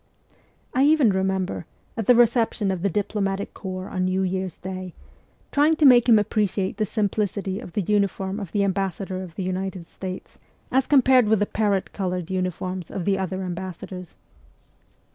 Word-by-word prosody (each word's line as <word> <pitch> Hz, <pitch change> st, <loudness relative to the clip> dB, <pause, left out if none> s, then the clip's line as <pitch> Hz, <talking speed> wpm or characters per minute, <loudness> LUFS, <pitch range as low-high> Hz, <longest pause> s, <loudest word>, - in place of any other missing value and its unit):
(I 260 Hz, -, +2 dB
even 295 Hz, -7 st, +5 dB
remember, 190 Hz, -2 st, -1 dB, 0.3 s
at 225 Hz, -4 st, -3 dB
the 245 Hz, -, +7 dB
reception 230 Hz, -4 st, +3 dB
of 185 Hz, -2 st, -3 dB
the 200 Hz, -, +1 dB
diplo 205 Hz, +3 st, -1 dB
matic 195 Hz, 0 st, -2 dB
corps 185 Hz, -1 st, -6 dB
on 185 Hz, -1 st, -1 dB
New 185 Hz, +1 st, +1 dB
Year's 185 Hz, -1 st, -2 dB
Day, 185 Hz, -1 st, -7 dB, 0.6 s
trying 300 Hz, +3 st, +4 dB
to 305 Hz, -, +3 dB
make 245 Hz, -2 st, +7 dB
him 225 Hz, -, +8 dB
appreciate 205 Hz, -2 st, 0 dB
the 215 Hz, -, +1 dB
simplicity 200 Hz, -2 st, -1 dB
of 175 Hz, -, -10 dB
the 205 Hz, -, 0 dB
uniform 200 Hz, 0 st, 0 dB
of 195 Hz, -6 st, -6 dB
the 205 Hz, -, +1 dB
ambassa 195 Hz, -1 st, -1 dB
dor 185 Hz, -1 st, -4 dB
of 175 Hz, -3 st, -9 dB
the 195 Hz, -, -3 dB
United 185 Hz, -1 st, -3 dB
States 185 Hz, -1 st, -8 dB, 0.3 s
as 265 Hz, 0 st, +2 dB
compared 260 Hz, -4 st, +5 dB
with 220 Hz, +1 st, +4 dB
the 205 Hz, -, +1 dB
parrot 205 Hz, -3 st, 0 dB
coloured 180 Hz, -2 st, -3 dB
uniforms 185 Hz, -1 st, -3 dB
of 180 Hz, -, -4 dB
the 195 Hz, -1 st, +1 dB
other 190 Hz, 0 st, -3 dB
ambassadors.) 180 Hz, 0 st, -6 dB
195 Hz, 175 wpm, -24 LUFS, 185-210 Hz, 0.6 s, him